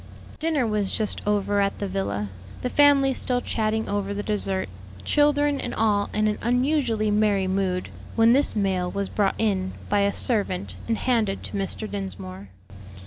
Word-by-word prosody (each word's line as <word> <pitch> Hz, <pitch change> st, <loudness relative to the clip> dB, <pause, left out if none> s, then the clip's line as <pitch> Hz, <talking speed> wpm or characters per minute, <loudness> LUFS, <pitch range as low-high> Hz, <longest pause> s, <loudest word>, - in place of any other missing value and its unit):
Dinner 310 Hz, -5 st, +1 dB
was 210 Hz, -3 st, 0 dB
just 215 Hz, -2 st, -1 dB
over 205 Hz, 0 st, +1 dB
at 200 Hz, 0 st, 0 dB
the 200 Hz, -, -3 dB
villa, 105 Hz, -, -3 dB, 0.3 s
the 250 Hz, -, -1 dB
family 280 Hz, -2 st, +5 dB
still 250 Hz, -1 st, +1 dB
chatting 220 Hz, -2 st, -1 dB
over 200 Hz, 0 st, -2 dB
the 205 Hz, -, -3 dB
dessert, 195 Hz, -3 st, -1 dB, 0.4 s
children 290 Hz, -1 st, +2 dB
and -, -, -4 dB
all 210 Hz, -2 st, +1 dB
in 215 Hz, 0 st, +1 dB
an 210 Hz, -, -1 dB
unusually 245 Hz, -3 st, +1 dB
merry 205 Hz, -2 st, +2 dB
mood, 185 Hz, -1 st, -1 dB, 0.3 s
when 230 Hz, +1 st, +5 dB
this 280 Hz, -1 st, +3 dB
mail 190 Hz, -3 st, 0 dB
was 200 Hz, +1 st, -3 dB
brought 200 Hz, -2 st, +1 dB
in 190 Hz, -4 st, 0 dB, 0.2 s
by 205 Hz, -, +2 dB
a 200 Hz, 0 st, +3 dB
servant, 200 Hz, -6 st, -1 dB
and 225 Hz, -1 st, 0 dB
handed 220 Hz, -6 st, 0 dB
to -, -, -6 dB
Mr. 200 Hz, +2 st, -3 dB
Dinsmore. 100 Hz, -, -6 dB
210 Hz, 165 wpm, -24 LUFS, 195-235 Hz, 0.4 s, family